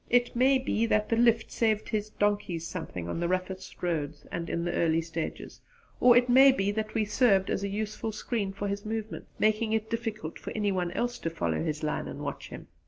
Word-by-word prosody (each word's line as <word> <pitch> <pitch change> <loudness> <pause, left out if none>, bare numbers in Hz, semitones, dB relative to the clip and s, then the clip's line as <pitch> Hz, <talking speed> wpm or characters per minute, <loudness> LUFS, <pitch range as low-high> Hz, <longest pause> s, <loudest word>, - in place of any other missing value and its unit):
It 245 0 +2
may 265 +3 +5
be 230 -3 0
that 215 -1 +1
the 230 - +3
'lift' 230 -1 +3
saved 215 -2 +1
his 215 -1 -1
donkeys 205 -6 -1
something 160 - -5
on 85 - -3
the 170 - 0
roughest 185 +1 -4
roads 150 -4 -2
and 170 0 -4
in 170 0 -1
the 175 - -1
early 165 -1 +2
stages; 165 0 -5 0.4
or 245 -1 +7
it 245 0 +4
may 265 +2 +8
be 200 -6 0
that 215 +1 -3
we 220 -1 +2
served 205 -2 +3
as 195 - -1
a - - 0
useful 215 +2 -3
screen 215 -2 -2
for 200 +1 -4
his 200 0 -3
movements, 220 0 -5
making 215 +1 +2
it 220 0 -1
difficult 225 -8 -4
for - - -7
any 210 -2 +1
one 180 -2 -1
else 240 +4 -2
to 165 - -2
follow 165 - -1
his 155 -2 -3
line 150 - -1
and - - -7
watch - - -5
him. - - -9
210 Hz, 220 wpm, -29 LUFS, 175-225 Hz, 0.4 s, may